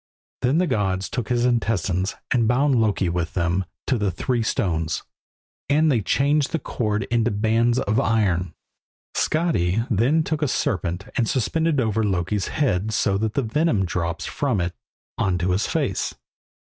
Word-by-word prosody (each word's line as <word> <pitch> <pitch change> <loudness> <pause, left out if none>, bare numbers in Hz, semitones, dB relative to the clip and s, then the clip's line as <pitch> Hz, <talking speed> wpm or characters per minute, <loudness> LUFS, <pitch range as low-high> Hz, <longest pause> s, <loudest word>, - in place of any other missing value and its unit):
Then 130 +5 +2
the 180 - +3
gods 95 - 0
took 120 -4 -3
his 120 -1 +2
intestines 100 -6 0 0.2
and 115 -3 +3
bound 135 +4 +3
Loki 105 -3 +1
with 85 -1 -2
them 90 +1 0 0.2
to 130 -4 0
the 105 -1 +1
three 120 - -1
stones, 85 -9 -1 0.7
and 155 +2 +4
they 120 -5 +2
changed 140 +6 +1
the - - +1
cord 105 -7 -2
into 120 0 +2
bands 115 +3 +2
of 110 -4 +1
iron. 95 -7 +1 0.6
Skadi 115 - +1
then 130 +10 +3
took 155 0 -2
a 150 - +2
serpent 95 - -1
and 115 -3 +1
suspended 160 +4 +1
it - - +3
over 110 0 0
Loki's 95 0 0
head 110 -8 0
so 100 -2 +1
that 110 0 -2
the 140 - +1
venom 115 - +1
drops 85 -1 -2
from 130 -8 -1
it 85 0 -1 0.5
on 95 -2 +1
to 90 +1 0
his 95 +4 +1
face. - - -1
110 Hz, 165 wpm, -23 LUFS, 95-130 Hz, 0.7 s, and